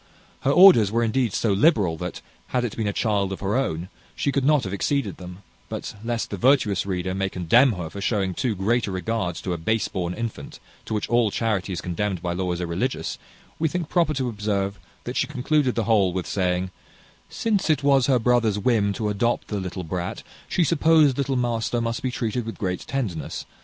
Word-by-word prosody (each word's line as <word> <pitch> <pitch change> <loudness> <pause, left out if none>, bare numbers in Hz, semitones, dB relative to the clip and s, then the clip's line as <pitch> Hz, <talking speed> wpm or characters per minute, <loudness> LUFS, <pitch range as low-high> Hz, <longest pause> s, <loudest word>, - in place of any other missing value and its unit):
Her 135 - 0
orders 145 - +7
were 115 +1 +1
indeed 115 0 +1
so 105 +2 +1
liberal, 100 - +3
that, 90 +2 -5 0.3
had 125 -1 0
it 115 - -4
been 110 -2 -2
a - - +1
child 100 -2 0
of 95 - -5
her 100 +2 0
own, 90 -10 -1 0.3
she 140 - 0
could 140 -1 0
not 150 0 +3
have 95 - -4
exceeded 105 0 -1
them; 90 +1 -10 0.3
but, - - -5
lest 115 0 -2
the 100 - -3
virtuous 110 -5 +2
reader 95 -1 -2
may 95 0 -1
condemn 115 +9 +4
her 90 -4 -5
for 100 +5 -8
showing 100 -3 0
too 120 +2 -1
great 115 +5 +1
regard 95 -1 -2
to 90 +2 -3
a 85 - -4
base 110 +7 0
born 90 -2 -3
infant, 110 -11 -6 0.3
to 110 - -3
which 105 - -2
all 120 -2 +3
charity 100 -3 -1
is 85 - -3
condemned 90 +2 -2
by 85 +1 -2
law 90 0 -2
as 90 0 -3
irreligious, 90 +10 -2 0.4
we 160 - +2
think 170 0 -3
proper 165 -4 +2
to 130 -1 -1
observe 100 -3 -2 0.2
that - - -5
she - - +1
concluded 130 0 0
the 115 - 0
whole 100 -5 +3
with 90 -1 -2
saying, 90 -1 -1 0.6
"Since 205 -6 0
it 150 -2 +2
was 135 -2 +4
her 135 -2 +4
brother's 115 -3 +2
whim 105 -2 +2
to 105 +1 -2
adopt 115 +4 0
the 105 - -2
little 90 -1 -5
brat, 90 +5 -4 0.3
she 180 - +2
supposed 155 -3 +4
little 135 -1 0
master 120 -1 0
must 115 0 -2
be 130 - -1
treated 120 -1 -2
with 115 - -6
great 90 -4 -2
tenderness. 110 - -3
110 Hz, 210 wpm, -24 LUFS, 95-125 Hz, 0.6 s, orders